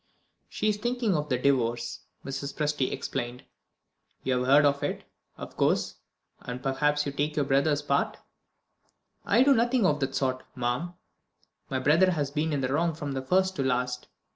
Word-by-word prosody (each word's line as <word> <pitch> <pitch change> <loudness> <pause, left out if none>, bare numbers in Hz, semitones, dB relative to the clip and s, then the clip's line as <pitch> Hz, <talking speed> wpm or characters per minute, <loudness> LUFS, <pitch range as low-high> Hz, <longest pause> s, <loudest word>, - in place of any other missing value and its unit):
"She 215 - -2
is 210 -1 +2
thinking 240 -2 0
of 150 -1 -2
the 125 - +2
Divorce," 120 -3 0 0.3
Mrs. 135 +1 -5
Presty 150 -3 0
explained. 125 -1 -4 0.8
"You 130 -1 +1
have 125 - -2
heard 145 +2 +6
of 140 0 +2
it, - - -3 0.3
of - - -9
course; - - +1 0.4
and 125 +1 -7
perhaps 150 +2 +1
you 140 - -2
take 145 +2 -2
your 145 - +1
brother's 145 +2 +2
part?" 140 -1 0 1.1
"I 240 - +5
do 280 +1 +6
nothing 240 -2 +2
of 150 -5 +2
the 135 -1 -1
sort, 130 -1 -1 0.2
ma'am. 125 +9 -2 0.7
My 135 - -1
brother 155 +8 +4
has 145 -6 -1
been 155 +2 -1
in 145 -2 0
the 130 +1 -1
wrong 165 +1 +1
from 145 -3 -4
first 190 +5 +2
to 135 - 0
last." 125 -1 -1
145 Hz, 170 wpm, -28 LUFS, 130-160 Hz, 1.1 s, heard